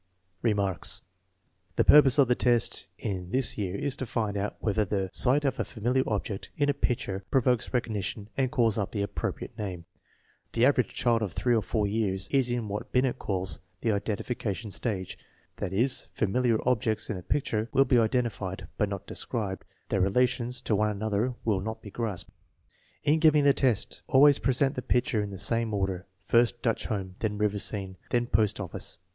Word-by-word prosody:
1 120 - +2
Remarks. 100 -4 -1 0.7
The - - +3
purpose 145 -2 +7
of 140 -3 +6
the 125 - +4
test 120 -2 +1
in 90 -3 -4
this 130 +5 +4
year 100 -3 -3
is 140 +5 -2
to 130 - -4
find 110 -3 -1
out 100 +1 -2
whether 105 0 +1
the 95 -2 -2
sight 140 +3 +4
of 135 -1 0
a - - +2
familiar 125 +3 0
object 105 -2 -3
in 145 -1 +2
a - - +3
picture 120 -8 -2
pro 135 - +4
vokes 125 -2 +1
recognition 110 -4 -2
and 130 -2 +1
calls 115 -3 +2
up 100 - -3
the 100 -2 0
appropriate 100 - -4
name. 90 -5 -5 0.7
2 115 - -1
The - - +7
average 130 -2 +3
child 115 -2 +1
of 100 -5 -2
3 120 - +1
or 115 - +3
4 105 +1 -1
years 100 -3 -1
is 135 -3 +2
in 120 -2 -1
what 105 +1 -5
Binet 130 0 +1
calls 95 -2 -2
" 90 +1 -42
the 115 - +1
identification 105 +1 -3
stage 95 -4 -3 0.2
"; - - -37
that - - -3
is, 120 +7 +1
familiar 115 +2 +1
objects 110 -3 +1
in 105 - -3
a - - -7
picture 110 0 -1
will 135 - +4
be 125 -2 +4
identified 110 -5 -1
but 105 - +2
not 100 -2 -5
described, 105 -6 -3 0.2
their 95 - +1
relations 125 +4 +1
to 110 - 0
one 105 +1 +2
another 110 +3 -1
will 105 -4 +1
not 110 +3 -4
be 105 - -9
grasped. 110 -6 -4 0.7
In 155 +2 +3
giving 155 -2 +5
the 140 -1 +6
test, 125 -7 0
always 140 +1 +6
present 130 +2 +2
the 125 - -4
pictures 125 -3 +1
in 100 - -5
the 100 - -7
same 115 +2 +1
order, 95 -1 -2 0.2
first 120 0 +2
Dutch 115 -2 0
Home, 95 -4 -4
then 105 -2 -2
River 105 -1 0
Scene, 95 -2 -3
then 120 0 +1
Post 105 -2 +1
Office. 90 -5 -6
110 Hz, 195 wpm, -28 LUFS, 100-125 Hz, 0.7 s, purpose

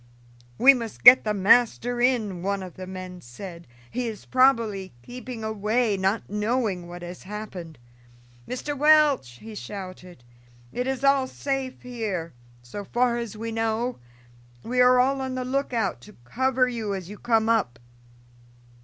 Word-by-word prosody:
"We 270 +3 +8
must 230 -4 -6
get 245 +2 +10
the 210 - +1
master 240 +4 +3
in," 220 -8 +1
one 195 +1 -2
of 180 -2 -9
the 185 0 -9
men 185 -1 -8
said. 170 +8 -10 0.2
"He 245 +1 -2
is 220 -2 -7
probably 230 -7 +2
keeping 245 - -8
away, 220 +1 0
not 195 +3 -1
knowing 210 -3 -1
what 175 0 -9
has 175 +1 -8
happened. 190 -6 -8 0.7
Mr. 285 +3 -4
Welch," 295 - +4
he 220 - -11
shouted, 185 -7 -9 0.5
"it 250 +1 -2
is 265 0 -2
all 275 -1 +4
safe 270 -1 -4
here, 215 - -4 0.3
so 160 +12 -7
far 240 +3 +1
as 225 -3 -6
we 225 +1 -4
know; 225 +2 -1 0.6
we 250 +2 +1
are 250 0 +6
all 270 +2 +2
on 260 -1 -3
the 255 0 -3
lookout 250 - -1
to - - -15
cover 260 - +1
you 225 -5 -3
as 185 -3 -6
you 205 +1 -10
come 225 -2 +2
up." 225 - +1
225 Hz, 155 wpm, -25 LUFS, 190-250 Hz, 0.7 s, get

